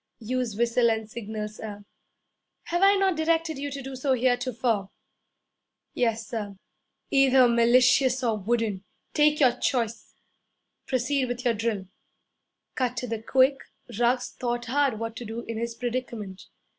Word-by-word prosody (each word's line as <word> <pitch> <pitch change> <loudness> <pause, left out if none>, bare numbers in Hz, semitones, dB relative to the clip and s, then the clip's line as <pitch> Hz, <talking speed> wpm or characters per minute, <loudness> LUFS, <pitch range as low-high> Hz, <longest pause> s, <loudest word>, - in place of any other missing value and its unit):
'Use 245 -1 -3
whistle 235 +1 +2
and 220 -1 -1
signal, 215 -2 -5
sir.' 210 -1 -9 0.8
'Have 345 +1 -2
I 395 +1 +6
not 385 -2 +2
directed 320 -1 0
you 285 +1 -3
to 275 -1 -6
do 270 0 -7
so 265 +1 0
heretofore?' 245 -4 0 1.0
'Yes, 225 -2 0
sir.' 210 -4 -5 0.6
'Either 270 -2 +5
malicious 250 +2 +4
or 225 -3 +1
wooden 215 -2 -1 0.3
take 300 0 +3
your 260 -4 +6
choice! 230 -4 -2 0.7
Proceed 260 +1 0
with 245 0 -5
your 240 - +3
drill.' 215 -3 -2 0.9
Cut 250 -2 -1
to 250 - -2
the 225 -2 -4
quick, 260 +4 +3 0.4
Ruggs 245 +1 +2
thought 240 -1 -3
hard 270 -1 +1
what 225 0 -5
to - - -6
do 225 +1 -5
in 230 -1 -5
his 235 0 -3
predicament. 230 -5 -5
240 Hz, 145 wpm, -26 LUFS, 225-260 Hz, 1.0 s, I